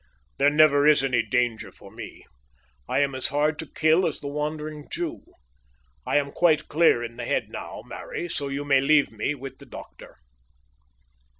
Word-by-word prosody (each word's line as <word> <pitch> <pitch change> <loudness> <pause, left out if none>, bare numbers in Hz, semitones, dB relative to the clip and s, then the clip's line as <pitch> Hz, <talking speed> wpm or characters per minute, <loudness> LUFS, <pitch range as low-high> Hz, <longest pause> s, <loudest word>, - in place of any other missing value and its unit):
"There 140 +1 +5
never 150 -1 +5
is 150 -3 +5
any 125 -3 +2
danger 115 +1 -1
for - - -15
me. - - -10 0.6
I - - +2
am 140 -1 0
as 130 -1 -2
hard 150 +2 0
to 160 - -6
kill 160 +4 +3
as 160 - -4
the 145 - -6
Wandering 150 0 -4
Jew. 170 -2 -4 0.9
I - - +2
am 140 -1 0
quite 155 -2 +2
clear 150 -6 +3
in 115 0 -7
the 120 - -5
head - - -1
now, - - -7
Mary; 175 - -6
so 145 -4 -3
you 140 +1 -4
may 135 -2 +4
leave 145 +1 +3
me 115 +7 -2
with 135 -1 -9
the - - -14
doctor." - - -12
145 Hz, 180 wpm, -25 LUFS, 135-155 Hz, 0.9 s, There